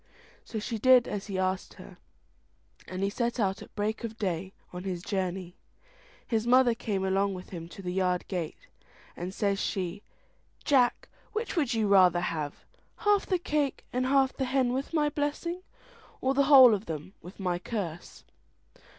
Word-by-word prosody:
So 225 - -6
she 220 +1 -3
did 255 +1 +6
as 205 0 -4
he 195 -2 -3
asked 185 0 -1
her, - - -13 0.9
and 185 +1 -4
he 200 - +2
set 240 +3 -1
out 195 -2 0
at - - -13
break 215 +2 -2
of 225 -1 -5
day 185 -2 -2 0.2
on 180 0 -6
his 180 -3 -4
journey. 185 -2 -3 0.7
His 225 -1 -1
mother 250 -1 +5
came 210 -5 -2
along 195 +1 +1
with 180 - -10
him 170 -2 -7
to 195 - -10
the 180 0 -3
yard 180 -1 0
gate, 175 -5 -3 0.6
and 175 +2 -5
says 200 0 0
she, 190 -1 -2 0.6
"Jack, 255 -4 +3 0.3
which 435 0 -3
would 280 -8 +1
you 220 -2 +1
rather 185 -3 +5
have, 150 -4 -4 0.3
half 415 -2 +2
the 370 - +2
cake 295 -5 -1
and 255 +1 0
half 270 -1 +3
the 265 - -1
hen 255 -1 +1
with 265 +2 -3
my 305 -2 +2
blessing, 295 +4 -2 0.6
or 260 +1 +1
the 280 0 +3
whole 265 -4 +9
of 205 -2 -3
'em 160 +4 -5
with 180 +4 -12
my 180 -2 -1
curse?" 175 -5 -5
205 Hz, 175 wpm, -29 LUFS, 185-260 Hz, 0.9 s, whole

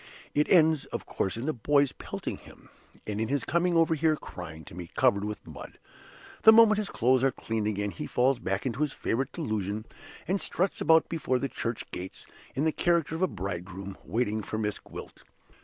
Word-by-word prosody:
It 150 +1 +2
ends 160 -5 +5
of - - -6
course 95 - -2
in 115 - -4
the 155 - 0
boys 140 +3 +2
pelting - - -6
him, - - -17 0.4
and 105 0 -3
in 110 - 0
his 140 +3 0
coming 170 +2 +1 0.2
here 155 0 +2
crying 80 - -9
to - - -12
me, 85 -1 -7
covered 100 0 +3
with 105 0 -5
mud. - - -10 0.6
The 220 - +9
moment 220 -1 +7
his 210 - -2
clothes 130 +2 +2
are 135 - +5
cleaned 110 -3 -2
again 105 -1 -1
he 85 - -6
falls 125 +1 +2
back 95 -1 -2
into 130 +2 -2
his 150 -2 +1
favorite 135 +4 -1
delusion, 110 - -3 0.4
and 190 +2 +1
struts 185 +2 -1
about 160 -1 +5
before 140 -6 0
the 140 +2 -2
church 115 -1 -4
gates, 90 +1 -7 0.3
in 140 - 0
the 160 - +3
character 170 -2 +1
of 165 - -3
a 185 - +4
bridegroom, 95 - -5
waiting 110 -1 -1
for 110 - -4
Miss 105 -1 -1
Gwilt. - - -10
125 Hz, 195 wpm, -28 LUFS, 105-160 Hz, 0.6 s, The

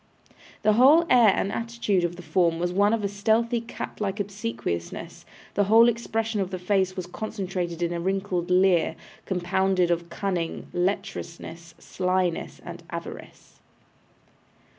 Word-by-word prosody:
The 215 0 +5
whole 280 +9 +6
air 235 -5 +7
and 195 - -1
attitude 230 -5 -1
of 175 0 -1
the 180 - -10
form 170 0 +2
was 175 +1 -1
one 205 +2 +3
of 220 -3 0
stealthy 225 +4 +1
cat 230 - -7
like 200 0 -2
obsequiousness; 115 - -4 0.3
the 205 - +2
whole 225 +3 +7
expression 225 -2 -1
of 185 - -2
the 185 - -4
face 185 0 0
was 185 -3 -4
concentrated 180 -3 -4
in 170 0 -1
a 170 - -2
wrinkled 185 -1 -1
leer, 180 -1 +3 0.3
compounded 185 0 +1
of 170 0 -1
cunning, 175 -3 -3
lecherousness, 175 -3 -4
slyness, 185 -1 -1
and - - -8
avarice. - - -9
190 Hz, 140 wpm, -25 LUFS, 175-210 Hz, 0.3 s, air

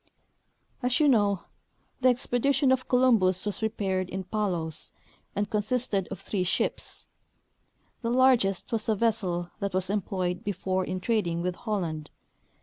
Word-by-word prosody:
As 250 0 +1
you 300 - +5
know, 205 -7 +3 0.6
the 255 0 +5
expedition 260 +2 +2
of 260 -1 +1
Columbus 220 -8 +3
was 205 - -2
prepared 195 -4 -1
in 190 0 -4
Palos, 180 -6 -2 0.4
and 205 +1 0
consisted 210 -2 0
of - - -7
three 195 -3 -2
ships. 180 - -2 1.0
The 230 - -1
largest 245 -6 +3
was 225 -1 -1
a 220 - +3
vessel 195 -6 0
that 200 -2 -2
was 185 +1 +2
employed 185 -3 -2
before 190 -1 -1
in 185 0 -4
trading 175 -7 0
with 180 0 0
Holland. 175 -8 -3
205 Hz, 140 wpm, -28 LUFS, 185-235 Hz, 1.0 s, you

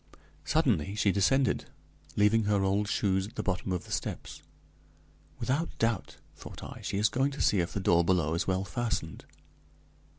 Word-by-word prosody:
Suddenly 110 - +1
she 105 -2 +3
descended, 125 +7 +2 0.5
leaving 105 +1 +3
her 100 -1 +2
old 100 +2 +1
shoes 95 -1 +1
at 110 - -15
the 105 - -3
bottom 95 -1 -2
of 90 - -2
the - - -12
steps. - - -4 1.0
"Without 135 +8 -1
doubt," 115 -4 -1 0.2
thought - - -10
I, - - -8
"she - - -3
is 105 +2 +4
going 135 +5 +1
to 140 - -8
see 100 - +3
if 85 0 -1
the - - -1
door 85 -2 +4
below 85 -3 +2
is 85 - -1
well 95 0 +1
fastened." 95 -5 -3
100 Hz, 170 wpm, -30 LUFS, 95-115 Hz, 1.0 s, is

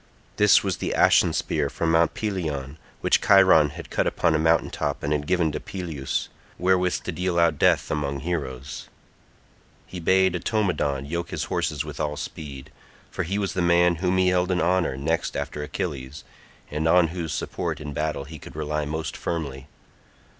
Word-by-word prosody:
This 105 0 +6
was 95 -3 -1
the - - -2
ashen - - +5
spear 75 -3 -1
from 80 +3 -1
Mount 80 0 +3
Pelion, 80 -9 -3 0.2
which - - +3
Chiron 95 -6 +6
had - - -10
cut - - +1
upon 80 - +1
a 80 - +2
mountain 80 0 +2
top - - -3
and 75 - 0
had 75 -1 -2
given 85 -3 +2
to - - -4
Peleus, 80 -8 -4 0.3
wherewith 90 0 +1
to - - -3
deal 90 -1 -1
out 85 -4 +3
death - - +3
among 70 -2 -2
heroes. 70 -5 -4 1.0
He 90 - -8
bade 95 +1 +3
Automedon 85 - 0
yoke 85 +3 -3
his - - -3
horses 75 0 -2
with 75 -2 -8
all 75 -1 -2
speed, 70 -4 -7 0.4
for - - -3
he 95 +5 -2
was 100 -3 -1
the 90 - -1
man 85 0 +4
whom 90 +1 +1
he 95 0 +4
held 90 0 +1
in 90 -1 +1
honour 90 -6 +1
next 80 +4 -1
after 75 - -4
Achilles, 75 -2 -5 0.5
and 75 +2 -1
on 85 0 +5
whose 85 -2 -4
support 80 +1 -3
in 75 -1 -6
battle 75 -1 -2
he 75 +2 -10
could - - -12
rely 75 0 -2
most 80 0 -4
firmly. 70 -5 -4
80 Hz, 180 wpm, -25 LUFS, 75-90 Hz, 1.0 s, This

